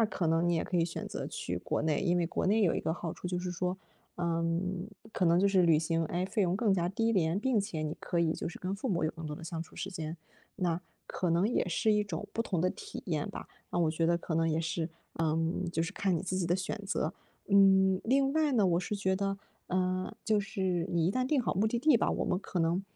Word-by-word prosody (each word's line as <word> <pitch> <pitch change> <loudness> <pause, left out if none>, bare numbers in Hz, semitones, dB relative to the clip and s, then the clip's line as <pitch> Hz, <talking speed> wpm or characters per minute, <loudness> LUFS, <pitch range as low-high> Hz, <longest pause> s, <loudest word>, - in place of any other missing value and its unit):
那 220 - +4
可 180 - -2
能 165 +2 +2
你 175 - +3
也 165 - 0
可 180 - -2
以 170 - +3
选 165 - -5
择 - - -4
去 - - -4
国 - - -2
内， 150 -1 +1
因 175 0 +2
为 175 -1 +1
国 170 - -1
内 215 +3 +3
有 175 - +3
一 - - -1
个 160 - -1
好 170 -1 -4
处 180 - -6
就 180 0 -1
是 180 0 -3
说， 180 +1 -1 0.4
嗯， 170 +3 -1 0.2
可 185 - +1
能 170 +1 +5
就 195 - +4
是 195 -2 +4
旅 165 -3 +5
行， 165 +1 0
诶， 175 +3 -1
费 200 +3 -1
用 180 0 +1
更 215 -2 +2
加 175 -2 +1
低 225 +4 +1
廉， 170 -2 +2
并 240 0 +2
且 195 -6 -3
你 155 0 -2
可 170 - -2
以 165 -1 +3
就 - - -4
是 175 - -9
跟 185 +1 -3
父 210 +6 -4
母 175 -6 +1
有 155 - +1
更 165 -1 -8
多 150 0 -5
的 165 - -9
相 165 0 -4
处 - - -17
时 195 - -4
间。 165 -3 -5 0.4
那 175 -3 0 0.3
可 180 - -2
能 170 +4 +3
也 225 -5 0
是 215 +5 +2
一 210 0 +3
种 200 -1 -5
不 230 - 0
同 185 -7 -1
的 185 +2 +2
体 420 - -8
验 - - -1
吧。 - - -7 0.2
那 - - -1
我 165 -2 +3
觉 165 +1 0
得 170 - +3
可 170 -1 -4
能 165 0 +2
也 160 0 +1
是， 165 0 -1 0.3
呃， 160 -1 +1 0.3
就 165 -1 0
是 165 +4 -3
看 195 -3 +1
你 - - -3
自 185 0 -2
己 185 -2 0
的 175 +2 +2
选 185 - -3
择。 175 -4 -1 0.4
嗯， 190 -1 +5
另 270 +3 +2
外 310 -1 +2
呢， 215 -6 +4
我 175 -1 +2
是 195 +3 -3
觉 190 -1 +1
得， 195 +1 -1 0.3
呃， 185 0 0
就 215 -2 +3
是 190 -4 -1
你 170 -1 +2
一 190 - +2
旦 255 0 0
定 280 0 +2
好 240 - 0
目 200 +4 +2
的 235 - -1
地 290 +1 +5
吧， - - +1
我 - - -1
们 - - 0
可 185 -2 -3
能， 165 +3 +1
180 Hz, 290 characters per minute, -31 LUFS, 165-200 Hz, 0.4 s, 能